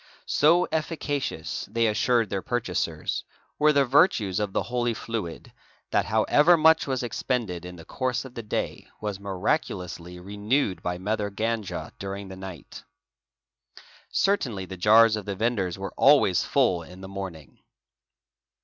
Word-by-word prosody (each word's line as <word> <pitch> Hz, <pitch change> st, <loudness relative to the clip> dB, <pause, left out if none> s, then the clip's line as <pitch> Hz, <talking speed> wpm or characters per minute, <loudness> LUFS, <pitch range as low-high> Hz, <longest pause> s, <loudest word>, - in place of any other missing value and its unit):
So 170 Hz, +5 st, +4 dB
— -, -, -38 dB
efficacious, 150 Hz, -, -3 dB
they 115 Hz, +1 st, +2 dB
assured 115 Hz, +1 st, +2 dB
their 95 Hz, -1 st, -1 dB
purchasers, 120 Hz, +2 st, -2 dB, 0.4 s
were 150 Hz, 0 st, +5 dB
the 140 Hz, -2 st, +3 dB
virtues 120 Hz, -, +3 dB
of 105 Hz, -2 st, -1 dB
the -, -, 0 dB
holy 120 Hz, -1 st, -1 dB
fluid, 105 Hz, -9 st, -5 dB, 0.4 s
that -, -, +2 dB
however 145 Hz, +10 st, +4 dB
much 160 Hz, 0 st, +5 dB
was 130 Hz, -2 st, -1 dB
expended 110 Hz, -6 st, -2 dB
in 90 Hz, 0 st, -8 dB
the 80 Hz, -2 st, -12 dB
course 130 Hz, +5 st, -2 dB
of 130 Hz, -, -10 dB
the 120 Hz, -, -5 dB
day 105 Hz, -, -3 dB
was 105 Hz, -2 st, -4 dB
miraculously 90 Hz, -2 st, -3 dB
renewed 100 Hz, +1 st, -1 dB
by 90 Hz, 0 st, -2 dB
Mother 105 Hz, +2 st, -2 dB
Ganga 110 Hz, 0 st, -3 dB
during 100 Hz, 0 st, -6 dB
the 95 Hz, -, -8 dB
night. 95 Hz, -4 st, -9 dB, 1.3 s
Certainly 125 Hz, -, 0 dB
the 95 Hz, -, -8 dB
jars 110 Hz, +4 st, +6 dB
of 105 Hz, -2 st, -5 dB
the 100 Hz, -1 st, -3 dB
vendors 100 Hz, -4 st, -1 dB
were 95 Hz, 0 st, -6 dB
always 135 Hz, -, +5 dB
full 90 Hz, -2 st, +2 dB
in 90 Hz, +3 st, -12 dB
the 95 Hz, -, -8 dB
morning." 95 Hz, -6 st, -8 dB
105 Hz, 150 wpm, -26 LUFS, 95-125 Hz, 1.3 s, jars